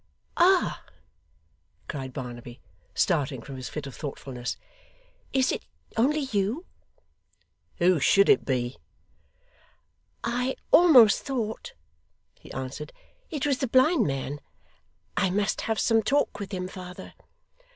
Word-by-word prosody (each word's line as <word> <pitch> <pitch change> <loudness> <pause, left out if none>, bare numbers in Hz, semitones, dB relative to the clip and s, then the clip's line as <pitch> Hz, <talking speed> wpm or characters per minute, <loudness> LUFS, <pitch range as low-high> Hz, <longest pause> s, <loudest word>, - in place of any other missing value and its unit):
'Ah!' 365 +1 +3 1.0
cried 135 -4 -5
Barnaby, 120 -1 -8 0.4
starting 145 -7 +1
from 135 - -8
his 130 -1 -6
fit 150 -2 -5
of 135 - -8
thoughtfulness. 130 -4 -5 0.7
'Is 265 -1 +2
it - - -3 0.3
only 285 +7 +2
you?' 235 - -1 1.1
'Who 175 -1 +4
should 200 +8 +5
it - - +5
be?' 125 -2 -2 1.5
'I 250 +3 -1 0.2
almost 285 -10 +7
thought,' 235 -6 -4 0.6
he - - -15
answered, 130 +3 -6 0.4
'it 295 -3 -2
was 275 -3 +1
the 265 - 0
blind 260 - +4
man. 135 +1 -3 0.8
I 190 - +2
must 200 +3 0
have 220 -2 +1
some 225 -1 +3
talk 275 -1 +1
with 200 -1 -6
him, 185 -2 -3
father. 180 -1 -9
195 Hz, 120 wpm, -27 LUFS, -, 1.5 s, almost